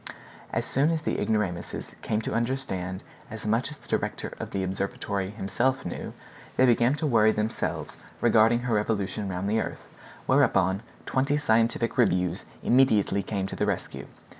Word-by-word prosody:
As - - -1
soon 140 +4 +2
as 160 -2 -1
the - - -1
ignoramuses 100 -6 -2
came 110 +1 -1
to - - -3
understand 115 -7 -2 0.3
as 110 -1 -8
much 115 +5 +1
as 150 - -9
the - - -20
director - - -2
of - - -5
the 95 - -2
observatory 95 +1 -2
himself 110 +6 -1
knew, 90 - -5 0.4
they 130 - +6
began 120 +2 +4
to 155 - -2
worry 110 -6 +5
themselves 110 +1 -2 0.2
regarding 115 0 +4
her 120 -1 -1
revolution 105 -1 -1
round 95 +1 -2
the 110 +2 +2
earth, - - -6 0.4
whereupon 95 +1 +3 0.2
twenty 135 +3 +1
scientific 115 -2 +1
reviews 90 -5 +2 0.2
immediately 110 -6 +4
came 100 -2 -2
to 95 - -5
the 105 - 0
rescue. 100 -3 -3
110 Hz, 160 wpm, -27 LUFS, 100-120 Hz, 0.4 s, they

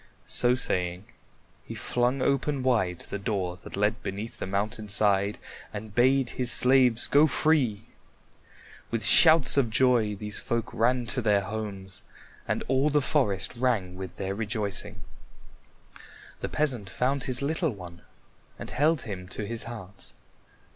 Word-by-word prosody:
So 125 0 +2
saying, 90 -6 -2 0.6
he - - -9
flung 125 +2 -1
open 140 0 0
wide 105 -9 0
the 100 - -3
door 95 -3 -2
that 90 - -10
led 105 +3 0
beneath 105 +4 -6
the - - -4
mountain 105 +2 -3
side 100 0 +2 0.3
and 105 0 -8
bade 130 +1 +2
his 125 -2 +1
slaves 125 -2 +4
go 145 +2 +4
free. 140 -10 +1 1.1
With 115 -1 -2
shouts 160 -4 +6
of 130 -4 +3
joy 115 -3 +2
these 105 +1 -5
folk 115 -1 -3
ran 120 +2 +1
to 125 +2 -2
their 105 -3 +2
homes, 100 -2 -6 0.5
and - - -1
all 135 +3 +2
the 150 0 +2
forest 130 - 0
rang 115 -7 -1
with 95 -1 -8
their 95 -1 -4
rejoicing. 105 -1 -4 1.4
The - - -4
peasant 125 -10 +1
found 130 +6 -1
his 130 +1 +3
little 160 +3 0
one 90 -6 -10 0.6
and - - -8
held 150 0 +1
him 90 -4 -7
to 105 +3 -6
his 115 +2 -4
heart. 100 -4 -10
115 Hz, 145 wpm, -27 LUFS, 100-130 Hz, 1.4 s, shouts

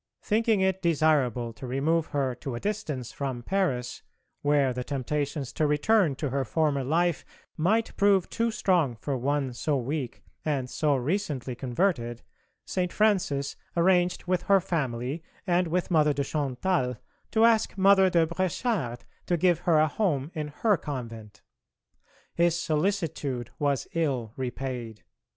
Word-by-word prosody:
Thinking 220 -1 +2
it 190 0 +1
desirable 145 - +2
to 125 +4 -8
remove 155 +6 +1
her 135 -3 -1
to 125 +1 -6
a - - -4
distance 160 - -3
from 130 -4 -4
Paris, 130 -9 -1 0.4
where 145 -3 +2
the 125 0 -3
temptations 140 0 -3
to 155 - +1
return 150 +2 +3
to 140 0 -3
her 135 0 0
former 145 +1 0
life 170 +5 +1 0.3
might 215 +8 +1
prove 200 -2 +4
too 230 0 0
strong 175 - +1
for 135 +5 -3
one 135 +1 -1
so 145 +4 0
weak 130 0 -4 0.2
and 140 -5 -1
so 150 -2 +1
recently 140 -2 -2
converted, 120 -2 -1 0.4
St. 180 -1 -1
Francis 185 -10 +1 0.2
arranged 180 0 +3
with 180 -1 0
her 195 -1 +4
family 135 -4 -2 0.2
and 180 -1 +2
with 180 +2 -1
Mother 150 -3 +4
de 140 0 -1
Chantal 140 -1 -1 0.3
to 225 0 +4
ask 225 -3 +3
Mother 190 0 +6
de 170 -2 +3
Bréchard 170 - -1 0.3
to 175 - +2
give 175 0 +3
her 175 -3 +3
a 155 +1 +5
home 150 -4 -1
in 155 -3 -3
her 200 +7 +1
convent. 115 -8 -7 0.9
His 170 0 +2
solicitude 155 - -1
was 140 -2 0
ill 130 -9 -1
repaid. 125 -3 -5
150 Hz, 145 wpm, -27 LUFS, 130-180 Hz, 0.9 s, Mother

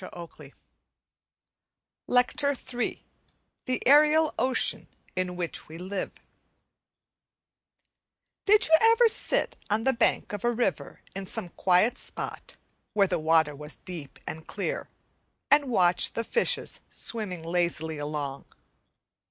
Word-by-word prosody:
Week 185 - -9 0.2
7 - - -13 1.6
LECTURE 275 +3 +2 0.2
III 245 - -3 0.6
The 255 -1 -2
Aerial 300 +2 +5
Ocean 255 +2 +1 0.3
in 185 -1 -2
Which 175 -2 -4
We 160 - -10
Live 185 +2 -4 2.4
Did 425 +2 +6
you 320 - +6
ever 455 +1 +6
sit - - +1
on 215 +2 +1
the 265 - +3
bank 230 -2 +1
of 205 - -5
a 240 - +2
river 195 - -2
in 195 0 -5
some 180 - -4
quiet 190 +9 +2
spot - - -6 0.4
where 200 -2 +4
the 180 -3 -1
water 160 -1 +3
was 150 +2 -6
deep 170 -7 -9
and 160 0 -7
clear, 200 - -4 0.6
and 290 0 +6
watch 180 -6 +3
the 230 - -2
fishes 470 - 0
swimming 195 -7 -2
lazily 165 -2 -1
along? 145 -2 -4
195 Hz, 120 wpm, -27 LUFS, 165-255 Hz, 2.4 s, Did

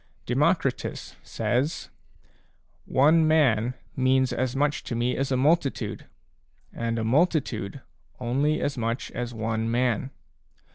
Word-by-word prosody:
Democritus* - - 0
says: 135 +6 -2 0.9
"One 155 +4 +4
man 130 -6 +3 0.2
means 130 0 +2
as 130 -1 -1
much 145 +1 0
to 120 - -4
me 120 +2 0
as 135 0 -2
a 130 - +2
multitude, 135 -6 0 0.7
and 115 0 -2
a 115 - -1
multitude 135 - 0 0.4
only 140 +5 0
as 140 -3 -2
much 115 +1 -2
as 120 -1 -4
one 110 0 -2
man." 120 +1 0
130 Hz, 115 wpm, -26 LUFS, 115-145 Hz, 0.9 s, One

